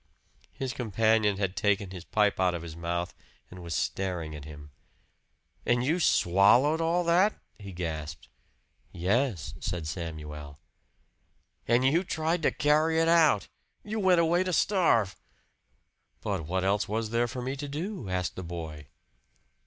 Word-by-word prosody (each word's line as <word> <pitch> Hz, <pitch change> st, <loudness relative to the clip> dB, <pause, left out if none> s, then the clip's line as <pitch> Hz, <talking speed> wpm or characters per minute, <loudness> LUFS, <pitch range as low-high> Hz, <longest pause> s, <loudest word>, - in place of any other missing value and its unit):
His 130 Hz, -2 st, -4 dB
companion 110 Hz, -2 st, +2 dB
had 95 Hz, -2 st, -2 dB
taken 100 Hz, -2 st, 0 dB
his 90 Hz, -2 st, -8 dB
pipe 105 Hz, -3 st, +1 dB
out 90 Hz, -1 st, +2 dB
of 85 Hz, -, -6 dB
his 80 Hz, -2 st, -8 dB
mouth 85 Hz, +1 st, -3 dB, 0.4 s
and 90 Hz, 0 st, -10 dB
was 85 Hz, -2 st, -4 dB
staring 85 Hz, -3 st, -2 dB
at 75 Hz, -1 st, -9 dB
him. 75 Hz, -1 st, -11 dB, 0.9 s
"And 120 Hz, 0 st, +1 dB
you 160 Hz, +7 st, +1 dB
swallowed 125 Hz, -, +4 dB
all 170 Hz, +2 st, +1 dB
that?" 180 Hz, +5 st, +3 dB, 0.2 s
he 100 Hz, -2 st, -9 dB
gasped. 80 Hz, -6 st, -5 dB, 0.6 s
"Yes," 100 Hz, -, -1 dB
said 90 Hz, -3 st, -4 dB
Samuel. 75 Hz, -3 st, -6 dB, 1.1 s
"And 120 Hz, +2 st, +3 dB
you 160 Hz, +7 st, +3 dB
tried 165 Hz, -1 st, -1 dB
to -, -, +2 dB
carry 155 Hz, +2 st, +2 dB
it 165 Hz, -, +3 dB
out! 160 Hz, -, +4 dB, 0.4 s
You 215 Hz, +1 st, -4 dB
went 185 Hz, -3 st, +4 dB
away 170 Hz, +2 st, +3 dB
to 185 Hz, -1 st, -2 dB
starve!" 160 Hz, -, +2 dB, 1.1 s
"But 95 Hz, -7 st, -3 dB
what 95 Hz, +2 st, -1 dB
else 100 Hz, +1 st, +1 dB
was 110 Hz, +1 st, -2 dB
there 120 Hz, +1 st, +1 dB
for 125 Hz, +1 st, -6 dB
me 130 Hz, +2 st, -3 dB
to 145 Hz, +1 st, -5 dB
do?" 155 Hz, -, -5 dB
asked 90 Hz, -1 st, -2 dB
the 95 Hz, -, -6 dB
boy. 80 Hz, -4 st, -7 dB
105 Hz, 150 wpm, -28 LUFS, -, 1.1 s, swallowed